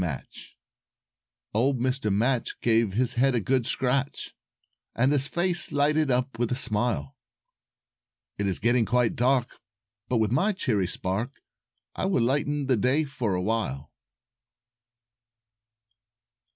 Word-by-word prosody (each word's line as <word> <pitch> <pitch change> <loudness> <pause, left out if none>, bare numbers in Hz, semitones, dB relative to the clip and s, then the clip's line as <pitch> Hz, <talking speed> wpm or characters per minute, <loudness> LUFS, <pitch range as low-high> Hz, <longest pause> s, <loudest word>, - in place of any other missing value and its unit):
MATCH 75 -6 -7 1.0
Old 125 +4 +1
Mr. 130 -3 0
Match 120 +5 0
gave 115 -3 +2
his 125 +3 +1
head 135 -1 +3
a - - +2
good 125 +2 0
scratch, 135 +2 -1 0.6
And 130 +4 +2
his 140 -1 +1
face 175 +1 -1
lighted 150 +1 +2
up 125 -1 -1
with 120 -1 0
a - - +1
smile; 105 - 0 1.2
"It 100 - 0
is 95 - 0
getting 120 +1 +2
quite 120 +2 +1
dark, 125 0 +1 0.5
but 125 - +1
with 110 -1 +1
my 195 - +2
cheery 110 - 0
spark 100 +9 -3 0.6
I - - -1
will 180 -11 +2
lengthen 145 +3 0
the 130 -2 +2
day 130 +8 +2
for 125 -9 -2
awhile." 90 -8 -2
125 Hz, 125 wpm, -26 LUFS, 110-135 Hz, 1.2 s, head